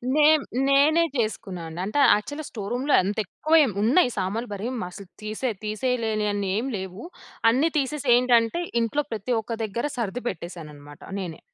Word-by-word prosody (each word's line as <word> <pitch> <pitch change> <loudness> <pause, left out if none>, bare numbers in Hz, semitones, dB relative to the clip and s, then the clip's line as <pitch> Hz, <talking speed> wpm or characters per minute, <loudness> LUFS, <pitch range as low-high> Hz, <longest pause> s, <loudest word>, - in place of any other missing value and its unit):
నేన్ 305 0 +6 0.3
నేనే 295 +4 +5
చేసుకున్నానండి. 180 -7 -3
అంటే 215 +9 -1 0.2
యాక్చువల్‌గా 290 +8 -5
స్టోర్ 205 -2 -6
రూమ్‌లో 270 +4 0
అంత 200 +4 -2
ఎక్కువేం 305 - +3
ఉన్నాయి, 245 +6 +4
సామాన్లు 210 +5 -2
మరి 205 +4 -4 0.2
మస్సలు 180 +2 -9
తిసే 215 +4 -2
తీసేయలేనియన్ని 215 -3 -1
ఏమి 255 +4 -2
లేవు. 190 +3 -7 0.5
అన్ని 275 +7 +2
తీసేసి 285 +1 -2
ఏంటంటే 245 +5 +3 0.2
ఇంట్లో 285 +6 0
ప్రతి 225 +3 -2
ఒక్క 225 +1 -6
దగ్గర 225 +5 -3
సర్ది 235 +1 -3
పెట్టేసానన్నమాట 150 -5 -8 0.2
నేనే. 175 -4 -6
225 Hz, 140 wpm, -25 LUFS, 195-265 Hz, 0.5 s, నేన్